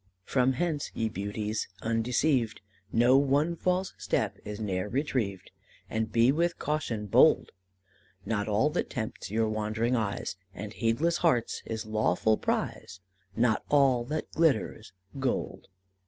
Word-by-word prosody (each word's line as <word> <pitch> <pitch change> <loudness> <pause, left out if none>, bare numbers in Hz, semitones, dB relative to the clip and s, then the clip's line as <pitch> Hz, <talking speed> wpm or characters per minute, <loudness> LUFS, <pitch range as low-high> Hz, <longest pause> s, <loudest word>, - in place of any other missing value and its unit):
"From 130 +5 +2
hence, 155 +1 -1
ye 110 -1 0
beauties, 105 +1 -3 0.2
undeceived, 115 +2 +1 0.3
Know 120 +3 +5
one 145 +4 +2
false 185 +2 0
step 95 - -1
is 105 0 -6
ne'er 95 -2 -2
retrieved, 115 - -2 0.4
And 110 0 -1
be 120 +2 +5
with 170 +3 0
caution 125 -8 -2
bold 100 - +4 0.7
Not 105 -2 -1
all 110 +8 +2
that 170 - -2
tempts 110 -6 -5
your 110 +2 +1
wandering 110 +3 0
eyes 100 -4 -2 0.2
And 105 +1 -6
heedless 145 +12 +1
hearts 155 -10 +1
is 110 -1 -4
lawful 110 0 +2
prize 95 - -3 0.4
Not 115 -1 +2
all 135 -4 +4
that 155 +4 -4
glitters 155 -8 +1 0.3
gold." 130 -1 -2
115 Hz, 130 wpm, -29 LUFS, 110-140 Hz, 0.7 s, Know